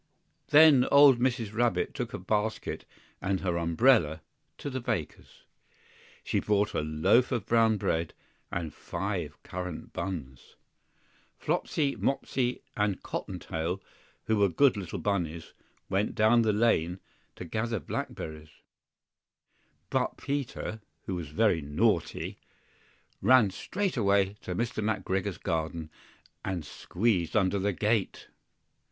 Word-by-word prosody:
THEN 150 Hz, -4 st, +7 dB
old 140 Hz, -3 st, +7 dB
Mrs. 120 Hz, -4 st, 0 dB
Rabbit 120 Hz, +1 st, +1 dB
took 120 Hz, -4 st, -4 dB
a -, -, -4 dB
basket 105 Hz, +4 st, -2 dB, 0.4 s
and 95 Hz, 0 st, -1 dB
her 90 Hz, -3 st, 0 dB
umbrella, 85 Hz, -, +3 dB, 0.4 s
to 145 Hz, -, -5 dB
the 130 Hz, -, -2 dB
baker's. 90 Hz, -, -4 dB, 0.8 s
She -, -, 0 dB
bought 105 Hz, 0 st, +1 dB
a -, -, 0 dB
loaf 80 Hz, +11 st, +3 dB
of 105 Hz, -, -1 dB
brown 115 Hz, -1 st, +3 dB
bread 80 Hz, -4 st, -1 dB, 0.4 s
and 80 Hz, -3 st, -3 dB
five -, -, -4 dB
currant 90 Hz, -2 st, -6 dB
buns. 80 Hz, -9 st, -6 dB, 0.8 s
FLOPSY, 140 Hz, -3 st, -1 dB
Mopsy, 130 Hz, -2 st, -1 dB
and 105 Hz, -2 st, 0 dB
Cottontail, 85 Hz, +4 st, -4 dB, 0.4 s
who 110 Hz, -, +1 dB
were 100 Hz, -1 st, +4 dB
good 130 Hz, -, +4 dB
little 95 Hz, -5 st, -5 dB
bunnies, 85 Hz, -5 st, -2 dB, 0.3 s
went 100 Hz, +2 st, 0 dB
down 110 Hz, +2 st, +5 dB
the 110 Hz, -1 st, +3 dB
lane 100 Hz, -5 st, +2 dB, 0.4 s
to 90 Hz, -, -7 dB
gather 110 Hz, +5 st, -2 dB
blackberries; 80 Hz, -2 st, -5 dB, 1.4 s
BUT -, -, 0 dB
Peter, 135 Hz, -5 st, -4 dB, 0.2 s
who 95 Hz, -, -3 dB
was 85 Hz, -3 st, -4 dB
very 90 Hz, +1 st, +2 dB
naughty, 75 Hz, +1 st, 0 dB, 0.8 s
ran 125 Hz, -6 st, +5 dB
straight 195 Hz, -, -3 dB
away 100 Hz, -2 st, +2 dB
to 90 Hz, -, -4 dB
Mr. 115 Hz, -1 st, -2 dB
McGregor's 95 Hz, -3 st, -1 dB
garden 80 Hz, -2 st, -3 dB, 0.5 s
and 90 Hz, -5 st, -3 dB
squeezed 95 Hz, -2 st, 0 dB
under 100 Hz, -1 st, +2 dB
the 100 Hz, +2 st, +1 dB
gate! 105 Hz, +1 st, -1 dB
100 Hz, 120 wpm, -29 LUFS, 85-115 Hz, 1.4 s, THEN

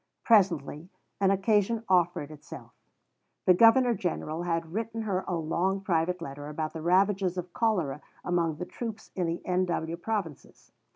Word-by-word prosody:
Presently 180 Hz, -, +2 dB, 0.3 s
an 195 Hz, -1 st, +3 dB
occasion 210 Hz, +3 st, +2 dB
offered 175 Hz, -5 st, +2 dB
itself. 150 Hz, -, -11 dB, 0.7 s
The 185 Hz, -, +7 dB
Governor 230 Hz, +5 st, +6 dB
General 170 Hz, -4 st, -3 dB
had 165 Hz, -1 st, -2 dB
written 225 Hz, +1 st, -3 dB
her 190 Hz, -3 st, -1 dB
a 180 Hz, -, -1 dB
long 170 Hz, +4 st, 0 dB
private 180 Hz, -2 st, 0 dB
letter 145 Hz, 0 st, -7 dB
about 155 Hz, +1 st, -4 dB
the 160 Hz, -, -6 dB
ravages 185 Hz, +1 st, +2 dB
of 180 Hz, 0 st, -5 dB
cholera 180 Hz, -, 0 dB, 0.2 s
among 170 Hz, -3 st, +1 dB
the 180 Hz, -, -5 dB
troops 225 Hz, 0 st, -7 dB
in 180 Hz, -3 st, 0 dB
the 165 Hz, +1 st, -4 dB
N.W. 175 Hz, -2 st, -1 dB
Provinces. 175 Hz, -6 st, -5 dB
180 Hz, 150 wpm, -28 LUFS, 165-200 Hz, 0.7 s, The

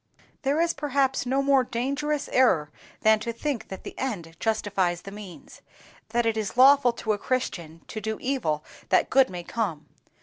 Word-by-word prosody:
There 280 Hz, +3 st, +1 dB
is, 335 Hz, 0 st, +2 dB
perhaps, 270 Hz, -2 st, 0 dB
no 270 Hz, +2 st, +1 dB
more 275 Hz, -2 st, +4 dB
dangerous 280 Hz, +5 st, -2 dB
error 160 Hz, -, +3 dB, 0.3 s
than 220 Hz, 0 st, +5 dB
to 235 Hz, +2 st, -3 dB
think 250 Hz, +2 st, -3 dB
that 190 Hz, -, -8 dB
the -, -, -7 dB
end 175 Hz, -11 st, -4 dB
justifies 195 Hz, -5 st, 0 dB
the 195 Hz, -, -8 dB
means—that 210 Hz, +4 st, -7 dB
it 225 Hz, -1 st, +1 dB
is 215 Hz, +1 st, -3 dB
lawful 270 Hz, -1 st, +7 dB
to 220 Hz, -2 st, -1 dB
a 205 Hz, -, -3 dB
Christian 170 Hz, -11 st, -3 dB
to 215 Hz, -, -6 dB
do 220 Hz, +1 st, -3 dB
evil 185 Hz, -, -1 dB, 0.2 s
that -, -, +3 dB
good 270 Hz, -1 st, +5 dB
may 180 Hz, -1 st, -6 dB
come. 185 Hz, -6 st, -3 dB
230 Hz, 170 wpm, -26 LUFS, 195-270 Hz, 0.3 s, lawful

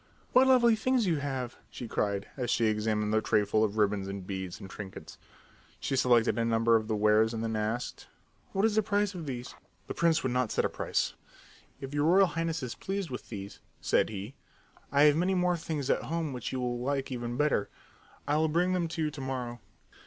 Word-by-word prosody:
"What 260 Hz, +1 st, +6 dB
lovely 240 Hz, -3 st, +6 dB
things 250 Hz, +1 st, +1 dB
you 170 Hz, -4 st, +1 dB
have!" 130 Hz, -3 st, -4 dB
she 120 Hz, -, -7 dB
cried 100 Hz, -2 st, -1 dB
as 125 Hz, -3 st, -3 dB
she 120 Hz, -2 st, +2 dB
examined 105 Hz, 0 st, 0 dB
the 110 Hz, -, +3 dB
tray 105 Hz, -1 st, +2 dB
full 110 Hz, +2 st, +2 dB
of 110 Hz, 0 st, -1 dB
ribbons 105 Hz, -2 st, +1 dB
and 100 Hz, -1 st, -6 dB
beads 95 Hz, -2 st, -5 dB
and 95 Hz, -, -8 dB
trinkets. 95 Hz, 0 st, -9 dB, 0.6 s
She 135 Hz, -, -1 dB
selected 120 Hz, -3 st, +3 dB
a -, -, +2 dB
number 115 Hz, 0 st, +3 dB
of 110 Hz, -1 st, +1 dB
the 110 Hz, -, 0 dB
wares 110 Hz, +2 st, +3 dB
and 110 Hz, -, -3 dB
then 115 Hz, -1 st, -2 dB
she 110 Hz, -, -1 dB
asked, 110 Hz, +3 st, -3 dB, 0.4 s
"What 195 Hz, +2 st, +1 dB
is 225 Hz, -, +2 dB
the 220 Hz, -, +4 dB
price 205 Hz, 0 st, 0 dB
of 170 Hz, -5 st, -7 dB
these?" 125 Hz, -2 st, -5 dB, 0.3 s
The -, -, -5 dB
prince 165 Hz, -1 st, +2 dB
would 130 Hz, -, 0 dB
not 125 Hz, -2 st, +1 dB
set -, -, +1 dB
a -, -, +1 dB
price. -, -, -1 dB, 0.7 s
"If 135 Hz, +1 st, -7 dB
your 145 Hz, 0 st, +1 dB
Royal 190 Hz, +4 st, +6 dB
Highness 165 Hz, -3 st, -2 dB
is 125 Hz, -, -3 dB
pleased 195 Hz, -5 st, -4 dB
with 125 Hz, -, -7 dB
these," 100 Hz, -2 st, -7 dB, 0.2 s
said -, -, +2 dB
he, 105 Hz, +3 st, -6 dB, 0.6 s
"I 140 Hz, +1 st, +5 dB
have 150 Hz, -1 st, +6 dB
many 180 Hz, +4 st, +1 dB
more 180 Hz, -1 st, +2 dB
things 155 Hz, -4 st, -3 dB
at -, -, +1 dB
home 165 Hz, -3 st, -3 dB
which 125 Hz, -2 st, -4 dB
you 130 Hz, -, -2 dB
will 120 Hz, -1 st, -2 dB
like 135 Hz, +1 st, -2 dB
even 120 Hz, -1 st, -4 dB
better. 150 Hz, -8 st, +1 dB, 0.6 s
I'll 155 Hz, +2 st, +2 dB
bring 175 Hz, +4 st, +1 dB
them 175 Hz, -2 st, 0 dB
to 160 Hz, 0 st, -3 dB
you 150 Hz, -, 0 dB
to 145 Hz, -2 st, -8 dB
morrow." 125 Hz, -2 st, -4 dB
125 Hz, 220 wpm, -30 LUFS, 110-165 Hz, 0.7 s, What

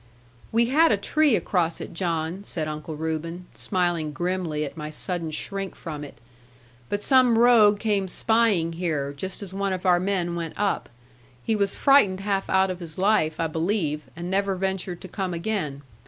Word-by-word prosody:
'We 230 Hz, +1 st, +3 dB
had 320 Hz, +5 st, +5 dB
a 210 Hz, -, +3 dB
tree 290 Hz, +5 st, +3 dB
across 170 Hz, -5 st, 0 dB
it, -, -, -7 dB
John,' 170 Hz, +1 st, -2 dB
said 160 Hz, -6 st, -4 dB
Uncle 155 Hz, +1 st, -5 dB
Reuben, 160 Hz, +3 st, -4 dB
smiling 175 Hz, -5 st, -1 dB
grimly 175 Hz, -3 st, -1 dB
at 140 Hz, -, -8 dB
my 150 Hz, -1 st, -5 dB
sudden 170 Hz, +1 st, -3 dB
shrink 195 Hz, +5 st, -4 dB
from 150 Hz, -3 st, -6 dB
it: 140 Hz, -2 st, -10 dB, 0.7 s
'but 205 Hz, 0 st, -2 dB
some 255 Hz, -3 st, +5 dB
rogue 225 Hz, -3 st, +6 dB
came 205 Hz, -3 st, 0 dB
spying 205 Hz, -4 st, +2 dB
here, 155 Hz, -5 st, -2 dB
just 190 Hz, +7 st, -5 dB
as 190 Hz, -2 st, -9 dB
one 195 Hz, 0 st, -1 dB
of 185 Hz, 0 st, -5 dB
our 180 Hz, -1 st, +5 dB
men 180 Hz, -2 st, -1 dB
went 165 Hz, -2 st, -4 dB
up. 205 Hz, -1 st, 0 dB, 0.5 s
He 225 Hz, -, +1 dB
was 200 Hz, -2 st, 0 dB
frightened 205 Hz, -9 st, +4 dB
half 195 Hz, -1 st, -1 dB
out 190 Hz, 0 st, +3 dB
of 180 Hz, -, -6 dB
his 165 Hz, -3 st, -8 dB
life, 185 Hz, -6 st, +2 dB
I 165 Hz, -, +1 dB
believe, 160 Hz, -2 st, -1 dB
and 170 Hz, +1 st, -6 dB
never 195 Hz, +1 st, +1 dB
ventured 190 Hz, -1 st, -3 dB
to -, -, -8 dB
come 185 Hz, -1 st, -3 dB
again. 165 Hz, -7 st, -3 dB
185 Hz, 180 wpm, -25 LUFS, 165-200 Hz, 0.7 s, rogue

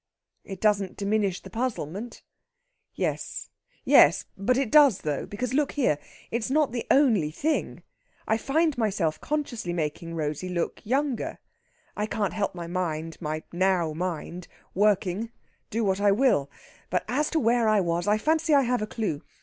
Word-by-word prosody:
"It 195 Hz, -2 st, -8 dB
doesn't 205 Hz, -3 st, +1 dB
diminish 200 Hz, -2 st, 0 dB
the -, -, -12 dB
puzzlement." 225 Hz, -, -4 dB, 0.7 s
"Yes -, -, -3 dB, 0.4 s
yes -, -, +6 dB
but 220 Hz, +6 st, +1 dB
it 270 Hz, -5 st, 0 dB
does, 285 Hz, -9 st, +6 dB
though. 150 Hz, -3 st, -2 dB
Because, 245 Hz, +4 st, -4 dB
look 290 Hz, +1 st, +1 dB
here! 245 Hz, -, +1 dB, 0.3 s
It's 235 Hz, +1 st, -1 dB
not 295 Hz, -1 st, +2 dB
the 240 Hz, -1 st, -4 dB
only 225 Hz, -, +4 dB
thing. 300 Hz, -, -2 dB, 0.4 s
I 220 Hz, -, +3 dB
find 310 Hz, +4 st, +1 dB
myself 190 Hz, -8 st, 0 dB
consciously 245 Hz, -11 st, -3 dB
making 165 Hz, +1 st, -3 dB
Rosey 155 Hz, +3 st, -3 dB
look 175 Hz, -2 st, -3 dB
younger. 265 Hz, +1 st, -1 dB, 0.6 s
I 210 Hz, 0 st, -1 dB
can't 205 Hz, -2 st, -1 dB
help 200 Hz, -3 st, -2 dB
my 170 Hz, -1 st, -5 dB
mind 165 Hz, -2 st, -3 dB
my 155 Hz, -1 st, -3 dB
now 175 Hz, -3 st, +1 dB
mind 175 Hz, +1 st, -4 dB, 0.3 s
working, 205 Hz, +1 st, +1 dB, 0.4 s
do 225 Hz, +1 st, -1 dB
what 195 Hz, -1 st, +1 dB
I 205 Hz, -1 st, +5 dB
will! 200 Hz, -, +2 dB, 0.4 s
But 180 Hz, -, 0 dB
as 285 Hz, +7 st, 0 dB
to 325 Hz, -, +1 dB
where 235 Hz, -2 st, +2 dB
it 215 Hz, -2 st, +4 dB
was, 170 Hz, +2 st, -1 dB
I 210 Hz, +1 st, +4 dB
fancy 315 Hz, +5 st, +2 dB
I 280 Hz, -, +5 dB
have 245 Hz, -2 st, 0 dB
a 215 Hz, -, -2 dB
clue. 210 Hz, -11 st, -3 dB
205 Hz, 160 wpm, -26 LUFS, 175-250 Hz, 0.7 s, yes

